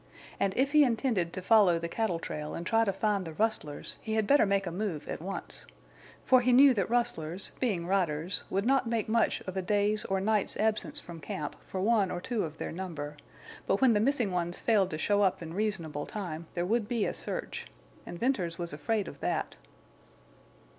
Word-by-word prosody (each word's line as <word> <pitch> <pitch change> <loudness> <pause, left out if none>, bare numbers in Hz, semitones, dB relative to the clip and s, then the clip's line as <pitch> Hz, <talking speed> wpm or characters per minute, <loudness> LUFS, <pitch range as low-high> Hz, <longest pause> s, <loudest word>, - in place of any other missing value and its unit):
And 195 -1 0
if 270 +2 +2
he 300 0 +7
intended 230 -8 +1
to 185 - -5
follow 200 -5 +5
the 165 0 -3
cattle 185 -1 -1
trail 150 -2 -5
and 170 - -5
try 225 +4 +3
to 200 - +1
find 200 0 0
the 165 -2 -7
rustlers 215 -9 -2
he 220 -1 -3
had 220 -1 +2
better 280 -2 +5
make 195 0 +1
a 175 - -3
move 180 -4 -3
at - - -5
once. 195 +3 -5 0.6
For 255 -1 +6
he 250 +1 +2
knew 265 +2 +8
that 200 -4 -1
rustlers, 195 -8 +1
being 200 -10 0
riders, 175 -2 0
would 195 +2 0
not 265 -2 +2
make 230 -2 0
much 230 +1 +2
of 185 - -7
a 190 - 0
day's 205 +2 +1
or 195 0 0
night's 210 +1 +1
absence 215 0 0
from 170 -1 -10
camp 150 -1 -5
for 190 - -4
one 210 -2 +3
or 175 - -3
two 225 +3 -2
of 160 -1 -6
their - - -4
number; 160 -5 -5 0.5
but 195 - +2
when 260 -3 +5
the 210 - +3
missing 240 -3 +1
ones 175 -1 -2
failed 205 -5 +3
to 155 - -4
show 205 +5 +2
up 190 -2 +2
in 165 -1 -7
reasonable 175 -8 -2
time 170 -6 -5
there 175 0 0
would 220 +2 0
be 230 -3 0
a - - -1
search. - - -5 0.4
And 175 - -8
Venters 185 -8 0
was 170 -3 -5
afraid 200 +8 -1
of - - -9
that. - - -2
195 Hz, 210 wpm, -30 LUFS, 175-225 Hz, 0.6 s, knew